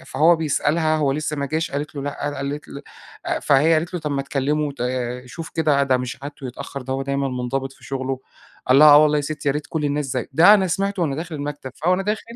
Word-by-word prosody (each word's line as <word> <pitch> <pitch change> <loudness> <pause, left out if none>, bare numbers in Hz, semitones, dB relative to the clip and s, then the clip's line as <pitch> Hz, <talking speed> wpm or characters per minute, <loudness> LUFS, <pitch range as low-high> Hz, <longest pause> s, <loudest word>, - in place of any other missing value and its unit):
أ - - -15
فهو 165 +3 +3
بيسألها، 155 +1 +1
هو 140 -3 +1
لسّه 150 +1 -3
ما 140 0 -2
جاش 160 +3 -2
قالت 145 +2 -4
له: 140 - -4
"لأ." 145 0 -3
أ 145 - -4
قالت 140 +2 -5
ل 140 - -9 0.4
أ - - 0
فهي 145 +4 +4
قالت 170 +3 -1
له: 175 - -2
"طب 150 -1 -3
ما 140 -1 -1
تكلّمه، 145 +2 -1
وت 140 -1 -8 0.5
شوف 145 +7 -8
كده 150 -3 +2
ده 130 -2 +2
مش 125 +1 -5
عادته 145 -2 -7
يتأخّر، 130 +2 -7
ده 130 +1 -4
هو 135 +1 -2
دايمًا 140 0 -1
مُنضبط 130 +1 -3
في - - -19
شغله." 135 -1 -3 0.5
قال 130 +1 +5
لها: 150 +1 +9
"آه 145 0 +9
والله 150 -1 +3
يا 145 - 0
ستّي، 150 0 -3
يا - - +3
ريت 150 0 -4
كل 155 -2 -2
الناس 145 0 -1
زيّه." 125 -1 -3
ده 170 +9 +7
أنا 195 -3 +2
سمعته، 195 +1 -1
وأنا 140 -5 -1
داخل 165 +1 -5
المكتب. 145 -2 -5
فوأنا 185 +2 +3
داخل 210 +2 -2
145 Hz, 250 wpm, -22 LUFS, 135-155 Hz, 0.5 s, لها